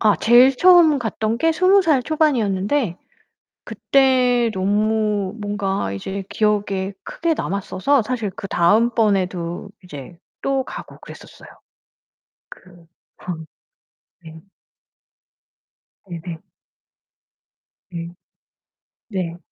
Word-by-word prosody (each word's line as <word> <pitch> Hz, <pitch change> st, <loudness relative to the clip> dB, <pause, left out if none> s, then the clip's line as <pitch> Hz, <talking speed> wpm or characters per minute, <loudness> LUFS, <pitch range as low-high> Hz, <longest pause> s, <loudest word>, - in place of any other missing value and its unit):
아 210 Hz, -2 st, +4 dB
제일 250 Hz, +3 st, +5 dB
처음 345 Hz, -4 st, +6 dB
갔던 220 Hz, -1 st, -2 dB
게 325 Hz, +5 st, +2 dB
20 370 Hz, +4 st, +4 dB
살 305 Hz, -7 st, +2 dB
초반이었는데 240 Hz, -, 0 dB, 0.7 s
그때 250 Hz, -3 st, +2 dB
너무 210 Hz, 0 st, 0 dB
뭔가 200 Hz, -, -2 dB
이제 190 Hz, -, -5 dB
기억에 200 Hz, -2 st, -1 dB
크게 335 Hz, 0 st, -2 dB
남았어서 200 Hz, -, -1 dB
사실 225 Hz, -2 st, -3 dB
그 195 Hz, -, -7 dB
다음 205 Hz, +7 st, +3 dB
번에도 185 Hz, -4 st, -1 dB
이제 160 Hz, -1 st, -11 dB, 0.2 s
또 270 Hz, -1 st, 0 dB
가고 -, -, -10 dB
그랬었어요. -, -, -13 dB, 1.0 s
그 175 Hz, -2 st, -16 dB, 0.4 s
방 160 Hz, -3 st, -6 dB, 0.8 s
네. 160 Hz, -1 st, -13 dB, 1.7 s
네네. 170 Hz, -1 st, -7 dB, 1.5 s
네. 170 Hz, -1 st, -6 dB, 1.0 s
네. 180 Hz, -5 st, -4 dB
210 Hz, 175 characters per minute, -20 LUFS, 185-255 Hz, 1.7 s, 처음